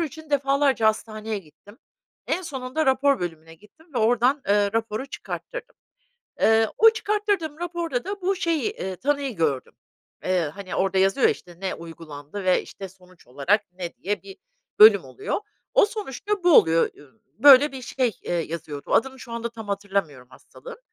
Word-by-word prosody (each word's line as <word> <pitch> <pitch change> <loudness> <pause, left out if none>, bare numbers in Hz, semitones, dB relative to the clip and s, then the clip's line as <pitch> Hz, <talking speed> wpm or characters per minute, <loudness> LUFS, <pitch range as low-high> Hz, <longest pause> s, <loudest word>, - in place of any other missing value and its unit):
için 315 -1 -6
defalarca 275 -4 +2
hastaneye 215 0 -1
gittim, 200 - -18 0.5
en 370 - -1
sonunda 270 -1 -3
rapor 270 +1 +3
bölümüne 165 -2 -6
gittim 210 - -22
ve 245 - 0
oradan, 245 +5 +2
ııı, 205 0 +3
raporu 225 +3 -2
çıkarttırdım. - - -7 0.7
Iıı, 225 0 +4
o 450 0 +8
çıkarttırdığım 410 -8 -1
raporda 340 -6 -3
da 400 +1 -5
bu 380 +1 0
şeyi, 335 +3 0
eee, 190 - -5
tanıyı 280 -1 -1
gördüm. 145 -6 -1 0.5
Eee, 180 -5 0
hani, 195 -2 -7
orada 190 0 +1
yazıyor 195 +7 +3
ya, - - +4
işte, 175 -2 -14
"ne 190 - -2
uygulandı 165 +1 -9
ve, 185 -1 +3
işte, 195 - -9
sonuç 185 -1 -21
olarak 160 - 0
ne" 180 -2 -7
diye 205 +1 -3
bir 390 0 -11 0.4
bölüm 430 +1 +8
oluyor. 410 0 -4 0.3
O - - +6
sonuçta 410 - -4
bu 350 - +5
oluyor, 165 0 +4
ü 145 +9 -20 0.2
böyle 280 +3 +8
bir 260 - -8
şey, 250 -1 -1
eee, - - -4
yazıyordu. 155 -3 -5
Adını 265 +2 +1
şu 235 - -10
anda 235 0 -3
tam 225 -2 -10
hatırlamıyorum 195 -11 -3
hastalığın. 475 - -13
225 Hz, 165 wpm, -24 LUFS, 185-295 Hz, 0.7 s, o